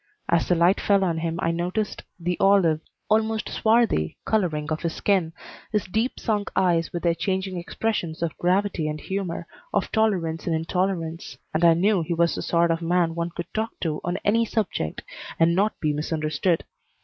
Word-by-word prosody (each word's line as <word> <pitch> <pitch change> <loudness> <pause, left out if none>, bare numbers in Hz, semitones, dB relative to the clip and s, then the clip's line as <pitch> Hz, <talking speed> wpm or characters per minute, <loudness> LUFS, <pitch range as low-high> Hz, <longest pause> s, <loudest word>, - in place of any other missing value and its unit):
As 170 -1 +2
the 180 - +3
light 175 +4 +3
fell 200 -1 +3
on 170 -3 0
him 165 0 -2
I 165 - +2
noticed 180 +5 -2 0.2
the 175 +1 -1
olive, 180 -6 +4 0.3
almost 220 0 +1
swarthy, 220 - +2
coloring 160 -8 0
of 155 - -1
his 170 -2 -2
skin, 190 -5 +1 0.4
his 210 -2 0
deep 220 +7 -1
sunk 210 -3 -1
eyes 175 -3 +2
with 175 - -4
their 170 -1 +3
changing 190 +2 -2
expressions 170 -2 -2
of 165 - -2
gravity 180 -2 +1
and 155 0 -3
humor, 185 -1 -3 0.3
of - - 0
tolerance 185 -8 0
and 165 - +2
intolerance, 165 0 -2 0.2
and 155 +2 0
I 165 -1 +7
knew 195 +2 +3
he 170 +1 -2
was 170 0 +2
the - - -3
sort 170 0 +2
of 165 +1 -1
man 170 0 +1
one 170 0 -2
could 170 0 -7
talk 220 +1 -2
to 155 -3 -2
on 175 +1 -1
any 225 +3 +4
subject 210 - -2 0.4
and 165 +1 +5
not 200 +4 +1
be 150 -2 0
misunderstood. 155 +2 0
175 Hz, 185 wpm, -25 LUFS, 165-200 Hz, 0.4 s, I